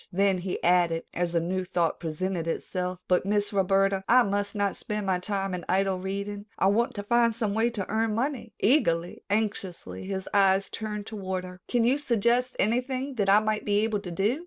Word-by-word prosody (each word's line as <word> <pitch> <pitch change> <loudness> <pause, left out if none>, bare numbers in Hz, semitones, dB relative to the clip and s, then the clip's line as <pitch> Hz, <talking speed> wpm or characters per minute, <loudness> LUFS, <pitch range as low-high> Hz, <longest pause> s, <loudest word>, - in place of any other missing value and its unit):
Then 195 0 +2
he 180 +1 -4
added 170 -2 +3
as 175 -1 -1
a - - +4
new 185 +3 -2
thought 175 -2 0
presented 170 +1 -3
itself: 180 +2 -3
"But, 180 - +3
Miss 205 +1 0
Roberta, 195 0 +2
I 250 +1 +7
must 205 0 -2
not 200 -1 0
spend 210 -1 -4
my 185 -2 +1
time 195 0 -2
in 180 -1 -4
idle 190 0 +1
reading. 200 +2 -4
I - - +1
want 235 +5 +1
to 205 - -4
find 235 +1 +3
some 220 -3 -1
way 225 +2 +2
to 210 -5 -4
earn 220 0 0
money." 240 -2 -2
Eagerly, 175 - +2
anxiously, 200 -4 -2
his 190 -1 -4
eyes 195 -1 +3
turned 210 -2 -4
toward 190 -4 -4
her. 180 0 -11
"Can 240 -2 +2
you 255 +5 +3
suggest 245 -1 +1
anything 255 +5 0
that 200 -2 +1
I 205 +2 +6
might 215 0 -1
be 205 0 +2
able 220 -1 0
to 195 -3 -8
do?" 200 - 0
200 Hz, 200 wpm, -27 LUFS, 185-220 Hz, -, I